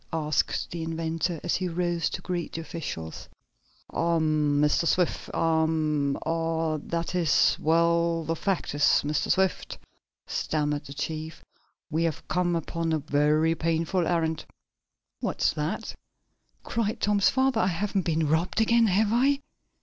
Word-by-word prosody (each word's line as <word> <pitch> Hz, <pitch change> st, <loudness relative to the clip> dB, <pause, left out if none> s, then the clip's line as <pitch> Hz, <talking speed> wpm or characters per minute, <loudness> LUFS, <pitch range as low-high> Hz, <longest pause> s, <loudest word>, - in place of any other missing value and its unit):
asked 155 Hz, -2 st, 0 dB
the 170 Hz, -, -4 dB
inventor, 165 Hz, +1 st, -2 dB
as 175 Hz, -, 0 dB
he 185 Hz, -, -2 dB
rose 175 Hz, -1 st, -1 dB
to -, -, -6 dB
greet 175 Hz, -2 st, -3 dB
the 165 Hz, -, -4 dB
officials. 130 Hz, -, -6 dB, 0.6 s
"Ahem, 155 Hz, -3 st, +1 dB
Mr. 150 Hz, +3 st, +2 dB
Swift. 180 Hz, -1 st, 0 dB
Ahem 160 Hz, -3 st, +1 dB
er 165 Hz, -1 st, -1 dB
that 170 Hz, +2 st, -3 dB
is 170 Hz, -5 st, +3 dB
well, 170 Hz, +1 st, +2 dB
the 165 Hz, +1 st, -2 dB
fact 190 Hz, -1 st, -2 dB
is, 145 Hz, -, -4 dB, 0.2 s
Mr. 150 Hz, 0 st, -1 dB
Swift," 190 Hz, 0 st, 0 dB, 0.5 s
stammered 150 Hz, -1 st, -2 dB
the 140 Hz, -, -8 dB
chief, 160 Hz, +2 st, -5 dB, 0.5 s
"we 160 Hz, +2 st, +1 dB
have 160 Hz, -3 st, -3 dB
come 175 Hz, -1 st, +1 dB
upon 165 Hz, 0 st, -2 dB
a 160 Hz, -, +2 dB
very 150 Hz, +2 st, +2 dB
painful 165 Hz, +2 st, 0 dB
errand." 160 Hz, -2 st, 0 dB, 0.8 s
"What's -, -, 0 dB
that?" -, -, -3 dB, 0.7 s
cried 225 Hz, -2 st, -2 dB
Tom's 205 Hz, -1 st, +3 dB
father. 260 Hz, -3 st, +2 dB
"I 185 Hz, -, +2 dB
haven't 195 Hz, +2 st, 0 dB
been 160 Hz, -2 st, 0 dB
robbed 160 Hz, +7 st, +1 dB
again, 230 Hz, +1 st, +4 dB
have 205 Hz, +2 st, +2 dB
I?' 275 Hz, +4 st, +3 dB
165 Hz, 140 wpm, -27 LUFS, 155-175 Hz, 0.8 s, again